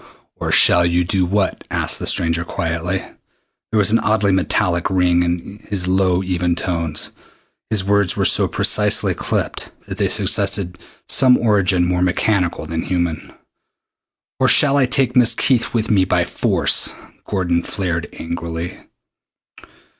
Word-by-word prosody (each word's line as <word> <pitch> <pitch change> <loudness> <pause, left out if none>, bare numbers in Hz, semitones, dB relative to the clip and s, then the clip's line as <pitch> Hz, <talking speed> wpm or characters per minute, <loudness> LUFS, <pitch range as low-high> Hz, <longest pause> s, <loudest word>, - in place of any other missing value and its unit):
"Or - - -3
shall 90 - +5
you 85 +1 +1
do 90 +1 -1
what?" 100 +1 -1
asked - - -1
the - - -4
stranger 85 0 +1
quietly. 85 +2 -3 0.7
There 110 - 0
was 105 -1 +3
an 115 - +3
oddly 105 -2 +1
metallic 90 -1 0
ring 90 -2 +2
in 90 +4 -4
his 95 -4 -3
low 95 0 +1
even 90 -2 -1
tones. 85 -4 -2 0.6
His 105 -3 0
words 100 -1 +1
were - - +1
so - - +4
precisely - - +2
clipped - - -3 0.2
that - - -7
they - - +1
suggested 90 -3 -1 0.3
some 130 -2 +4
origin 100 -5 +1
more 90 0 -1
mechanical 90 -2 0
than 80 +1 -4
human. 85 -3 -3 1.1
"Or - - +3
shall 140 -2 +5
I 135 -3 +3
take 130 -1 0
Miss 120 -2 +4
Keith 120 -2 +1
with 110 -2 -1
me 100 -3 +3
by 90 -1 +1
force?" 85 - +1 0.4
Gordon 90 -3 -1
flared 85 -3 -4
angrily. 85 0 -6
90 Hz, 145 wpm, -18 LUFS, 85-100 Hz, 1.1 s, shall